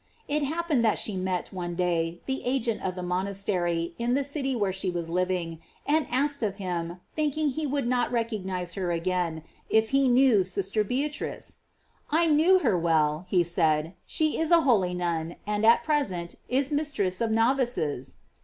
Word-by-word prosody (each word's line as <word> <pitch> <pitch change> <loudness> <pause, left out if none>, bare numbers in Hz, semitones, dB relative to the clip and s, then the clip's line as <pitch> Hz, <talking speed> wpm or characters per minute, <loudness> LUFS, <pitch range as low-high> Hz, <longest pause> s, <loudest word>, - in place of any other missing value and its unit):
It 300 +1 0
happened 310 -3 0
that 220 - +3
she 210 - -2
met, 185 0 -2
one 175 -2 -4
day, 170 -1 -1
the 265 0 -2
agent 245 -3 0
of 185 -1 -3
the 180 - -5
monastery 180 -2 -1
in 240 +1 +1
the 280 - +1
city 275 -1 -2
where 200 -5 0
she 190 0 -1
was 170 -2 -4
living, 180 -2 -1 0.3
and 305 +1 +2
asked 280 +2 0
of 205 -3 -1
him, 175 -3 -4 0.2
thinking 305 0 0
he 300 +3 -2
would 280 -1 -1
not 245 0 +1
recognize 190 -7 -2
her 185 -3 -2
again, 170 -2 -1 0.3
if 220 0 +3
he 275 0 +4
knew 245 -5 +5
sister 195 +3 -1
Bea 255 +8 0
trice? 295 - -5 0.5
"I 325 +3 +3
knew 325 +4 +5
her - - +3
well," 160 -1 +1
he 180 -2 +3
said: 160 -1 +1
"she 310 -1 0
is 320 -1 0
a 340 -1 +6
holy 195 - +2
nun, 170 -2 -2
and 210 +1 -1
at 230 - +6
present 190 - -1 0.2
is 270 +3 0
mistress 275 -12 -1
of 230 - +1
novices." 225 - 0
200 Hz, 175 wpm, -27 LUFS, 175-270 Hz, 0.5 s, a